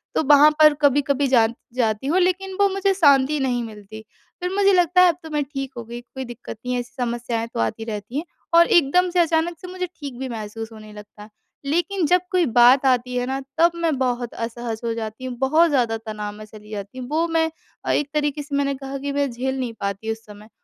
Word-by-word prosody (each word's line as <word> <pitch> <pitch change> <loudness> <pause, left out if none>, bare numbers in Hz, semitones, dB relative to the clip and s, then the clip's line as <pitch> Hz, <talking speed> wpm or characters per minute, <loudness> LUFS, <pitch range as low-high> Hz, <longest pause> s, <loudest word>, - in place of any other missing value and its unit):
तो - - +3
वहाँ 295 +1 +8
पर 305 -1 +8
कभी-कभी 280 0 +2
जान 230 -3 +3 0.2
जाती 225 0 0
हूँ 340 +6 +2
लेकिन 370 +1 0
वो 405 - +5
मुझे 390 0 +1
शांति 290 -4 +4
नहीं 250 -3 0
मिलती, 215 -1 -10 0.4
फिर 360 0 -2
मुझे 400 0 +4
लगता 360 0 +4
है 365 - +7
अब 335 - -1
तो 320 - -8
मैं 295 -1 0
ठीक 270 -1 -6
हो 235 - -5
गई, 235 +1 -8
कोई 260 +2 -8
दिक्कत 240 -1 -9
नहीं 250 - -1
है 245 - 0
ऐसी 245 0 -7
समस्याएँ 235 -1 -2
तो - - -4
आती 115 - -1
रहती 220 +3 -5
हैं 310 - -1 0.3
और 340 0 +7
एकदम 350 +3 +3
से 355 0 0
अचानक 335 0 +1
से 365 - -8
मुझे 365 0 -4
ठीक 275 -4 -7
भी 265 -1 -4
महसूस 225 0 -6
होने 215 -1 -12
लगता 210 0 -12
है। 215 - -14 0.4
लेकिन 350 +4 0
जब 360 +3 +4
कोई 360 -2 +3
बात 245 +2 +5
आती 250 -1 +1
है 245 0 0
ना, 265 +1 -2 0.2
तब 340 +1 +5
मैं 330 -5 0
बहुत 245 -2 -1
असहज 230 0 -5
हो 230 - 0
जाती 225 +2 -6
हूँ, 255 -1 -5
बहुत 310 +6 +3
ज़्यादा 240 -6 +1
तनाव 215 -2 -6
में 215 - -10
चली 215 0 -14
जाती 205 +3 -7
हूँ, 250 - -6
वो 320 +3 +1
मैं 325 -1 +1 0.4
अ, - - +1
एक 290 -1 0
तरीके 295 -1 -1
से 285 -1 -5
मैंने 280 0 +1
कहा 270 0 -6
कि 280 +1 -4
मैं 285 -1 0
झेल 265 +3 -3
नहीं 245 -3 -3
पाती 200 +3 -3
उस 225 0 -7
समय। 210 +1 -14
265 Hz, 235 wpm, -22 LUFS, 230-315 Hz, 0.4 s, वहाँ